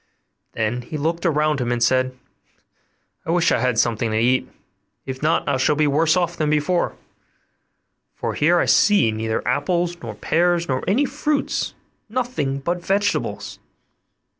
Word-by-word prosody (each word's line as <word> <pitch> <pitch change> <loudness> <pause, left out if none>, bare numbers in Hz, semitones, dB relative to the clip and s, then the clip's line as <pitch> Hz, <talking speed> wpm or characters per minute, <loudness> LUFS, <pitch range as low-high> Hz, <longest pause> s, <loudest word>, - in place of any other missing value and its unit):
Then 115 +2 -1
he 150 +5 -6
looked 165 +4 -1
around 150 -2 +1
him, 120 -1 -1
and 120 -1 0
said, 130 +1 +1 1.1
'I - - -9
wish 175 0 +3
I - - +2
had 125 -2 0
something 115 0 +1
to 110 - -1
eat, 125 +3 +2 0.6
if 130 -1 -6
not 155 +2 +1
I 140 -2 +1
shall 130 +3 +2
be 155 +1 +2
worse 155 +4 +3
off 175 -1 0
than 155 -1 -1
before; 155 +4 0 1.2
for - - -3
here 170 +4 +3
I - - +2
see 205 - +4
neither 110 0 -3
apples 170 +7 0
nor 110 -3 -7
pears, 170 +8 +1
nor 130 -1 -1
any 225 +9 +3
kind - - 0
of 295 - -14
fruits, 295 -1 -1 0.3
nothing 235 - -2
but 175 +4 -2
vegetables. 200 +3 -1
150 Hz, 165 wpm, -21 LUFS, 130-175 Hz, 1.2 s, see